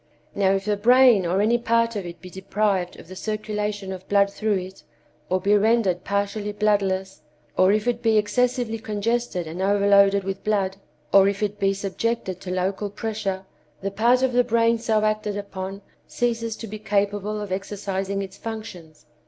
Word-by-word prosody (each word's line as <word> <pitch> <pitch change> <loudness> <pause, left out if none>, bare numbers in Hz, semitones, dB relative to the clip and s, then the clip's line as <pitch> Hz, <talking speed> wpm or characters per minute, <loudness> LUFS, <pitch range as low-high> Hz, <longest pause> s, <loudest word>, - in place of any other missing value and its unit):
Now, 195 -1 +2
if 195 0 -1
the 210 -1 0
brain 240 -3 +5
or 185 +3 +1
any 235 +3 +3
part 230 0 +1
of 195 -4 -4
it 170 0 -9
be 180 -1 -11
deprived 190 -1 -1
of - - -13
the 185 - -10
circulation 210 -1 -3
of 185 0 -10
blood 200 -1 +3
through 215 0 0
it, 185 0 -6 0.5
or 185 - +1
be 200 +3 +3
rendered 205 -4 +2
partially 200 +1 -2
bloodless, 195 -2 0 0.3
or 185 +1 +5
if 215 +2 0
it 240 -1 0
be 225 -2 +3
excessively 240 +1 0
congested 215 -3 -2
and 165 +4 -6
overloaded 200 0 +4
with 195 0 -5
blood, 195 -3 0 0.4
or 195 0 +7
if 200 +1 -1
it 205 0 -2
be 195 -1 +2
subjected 195 -1 -3
to 185 - -7
local 190 +3 -1
pressure, 205 -3 -4 0.4
the 195 +1 -2
part 240 +5 +3
of 260 -1 +1
the 245 0 +4
brain 230 -1 +2
so 220 -2 +1
acted 215 -1 -1
upon 195 -1 -6 0.2
ceases 230 -2 -1
to 225 - -8
be 215 0 -7
capable 205 0 -1
of 205 -2 -6
exercising 195 0 -3
its 190 0 -9
functions. 205 -10 -8
205 Hz, 175 wpm, -24 LUFS, 195-220 Hz, 0.5 s, or